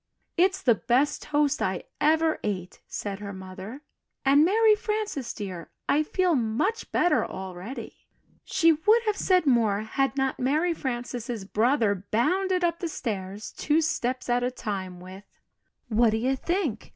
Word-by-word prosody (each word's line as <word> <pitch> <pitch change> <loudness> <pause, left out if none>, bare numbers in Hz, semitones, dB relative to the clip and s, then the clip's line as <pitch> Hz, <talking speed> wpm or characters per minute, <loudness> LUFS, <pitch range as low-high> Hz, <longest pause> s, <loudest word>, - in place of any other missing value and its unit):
"It's 375 +2 +2
the 245 - +5
best 260 +6 +1
toast 295 -1 +1
I 185 -1 -1 0.2
ever 320 +1 +3
ate," 185 -4 -4
said 200 -1 -5
her 205 -1 -6
mother, 190 +8 -9 0.4
"and 280 +2 +6
Mary 435 +5 +5
Frances, 425 - -2
dear, 185 -6 -7 0.2
I 295 - +3
feel 360 +3 +1
much 265 - -1
better 355 - +3
already." 190 +6 -8 0.4
She 330 0 +3
would 425 +9 +3
have 425 -2 0
said 365 -4 +2
more 225 -6 +3
had 270 +5 -1
not 270 -1 0
Mary 305 +7 +1
Frances' 240 -5 -4
brother 215 -3 +1
bounded 365 - +1
up 335 -1 +1
the 345 - -2
stairs 205 -6 -5
two 300 +2 +1
steps 255 -5 -1
at 245 0 +2
a 245 - +1
time 190 -7 -5
with, 185 +2 -11 0.6
"What 230 0 +3
do 220 - 0
you 255 +4 +1
think! 325 - -2
255 Hz, 150 wpm, -26 LUFS, 210-325 Hz, 0.6 s, and